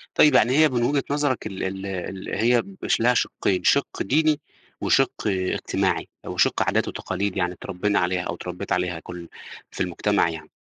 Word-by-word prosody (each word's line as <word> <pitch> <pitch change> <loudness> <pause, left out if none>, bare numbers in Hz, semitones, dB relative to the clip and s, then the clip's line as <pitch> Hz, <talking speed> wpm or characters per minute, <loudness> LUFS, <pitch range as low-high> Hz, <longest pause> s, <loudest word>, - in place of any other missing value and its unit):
طيب، 150 -3 +6
يعني 120 +2 +5
هي 155 -1 +6
من 120 -2 0
وجهة 140 +2 +1
نظرك 145 -6 0
ال 95 -3 -5
ال 95 +1 -4
ال 95 0 -5
هي 120 +3 +3 0.2
مش - - +1
لها 120 +2 +4
شِقين: 95 -5 0
شِق 140 - +2
ديني، 155 +1 +2 0.4
وشِق - - +3 0.2
اجتماعي، 95 -2 0 0.2
وشِق - - +1
عادات - - +1
وتقاليد 100 -1 -3
يعني 90 -1 0
اتربّينا 100 +3 -1
عليها، 90 +1 0
أو 85 - -4
اتربّيت 90 0 -7
عليها 90 -2 0
كلّ 85 +1 -9 0.4
في - - -6
المجتمع 85 - +1
يعني. 80 -1 -8
95 Hz, 170 wpm, -24 LUFS, 90-125 Hz, 0.4 s, طيب